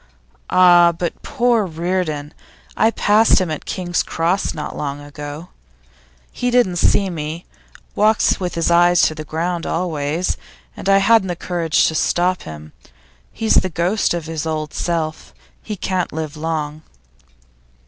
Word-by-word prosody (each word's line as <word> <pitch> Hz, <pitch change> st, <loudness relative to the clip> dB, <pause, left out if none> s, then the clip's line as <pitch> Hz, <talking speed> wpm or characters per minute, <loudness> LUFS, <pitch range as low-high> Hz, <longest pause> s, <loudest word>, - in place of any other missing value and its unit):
'Ah, 175 Hz, -1 st, +6 dB
but 170 Hz, 0 st, -4 dB
poor 240 Hz, -4 st, +1 dB
Reardon! 165 Hz, -4 st, -3 dB, 0.4 s
I 220 Hz, -, +3 dB
passed 220 Hz, 0 st, +3 dB
him 180 Hz, -4 st, -2 dB
at 155 Hz, -, -5 dB
King's 175 Hz, -2 st, -1 dB
Cross 170 Hz, +4 st, -1 dB
not 150 Hz, -, -5 dB
long 140 Hz, -1 st, -4 dB
ago. 145 Hz, +3 st, -8 dB, 0.8 s
He 245 Hz, -, -2 dB
didn't 240 Hz, -8 st, +2 dB
see 195 Hz, +2 st, +2 dB
me 160 Hz, +1 st, -5 dB, 0.5 s
walks 215 Hz, +1 st, +2 dB
with 180 Hz, -2 st, -3 dB
his 165 Hz, 0 st, +1 dB
eyes 175 Hz, 0 st, +4 dB
on -, -, -5 dB
the 155 Hz, 0 st, -7 dB
ground 165 Hz, +3 st, -3 dB
always 165 Hz, -1 st, -1 dB, 0.4 s
and -, -, -4 dB
I 195 Hz, -, +6 dB
hadn't 195 Hz, 0 st, +4 dB
the 175 Hz, -, -2 dB
courage 170 Hz, -2 st, 0 dB
to -, -, +1 dB
stop 175 Hz, +3 st, +1 dB
him. 75 Hz, 0 st, -10 dB, 0.6 s
He's 220 Hz, -1 st, +2 dB
the 185 Hz, -, +2 dB
ghost 175 Hz, +3 st, 0 dB
of 170 Hz, -2 st, -4 dB
his 160 Hz, 0 st, -4 dB
old 155 Hz, -1 st, -3 dB
self. 160 Hz, -2 st, -3 dB, 0.3 s
He 215 Hz, -, -5 dB
can't 185 Hz, -2 st, -2 dB
live 155 Hz, -1 st, -5 dB
long. 155 Hz, -1 st, -3 dB
170 Hz, 150 wpm, -19 LUFS, 155-185 Hz, 0.8 s, Ah